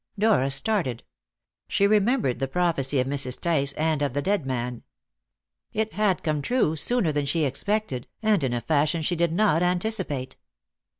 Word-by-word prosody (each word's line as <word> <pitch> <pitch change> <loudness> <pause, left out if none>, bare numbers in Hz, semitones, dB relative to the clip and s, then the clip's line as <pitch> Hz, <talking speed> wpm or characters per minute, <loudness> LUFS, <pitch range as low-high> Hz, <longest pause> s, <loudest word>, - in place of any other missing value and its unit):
Dora 205 -10 +3
started. 135 - 0 0.6
She 200 - +2
remembered 205 - +2
the 135 - -1
prophecy 145 -4 +1
of 125 - +1
Mrs. 135 -2 0
Tice 140 -5 +1
and 155 -1 0
of 140 -3 -1
the 145 - -1
dead 195 -8 0
man. 125 -2 -3 0.9
It 220 0 -2
had 205 -3 0
come 155 -3 -1
true 195 - +1
sooner 195 +2 +1
than 145 -1 -1
she 160 +3 +1
expected, 170 - -2 0.2
and 210 -7 +2
in 130 - 0
a 120 - -2
fashion 155 +3 +1
she 175 - 0
did 170 -1 +1
not 175 -3 +2
anticipate. 180 -7 -1
160 Hz, 165 wpm, -25 LUFS, 135-200 Hz, 0.9 s, Dora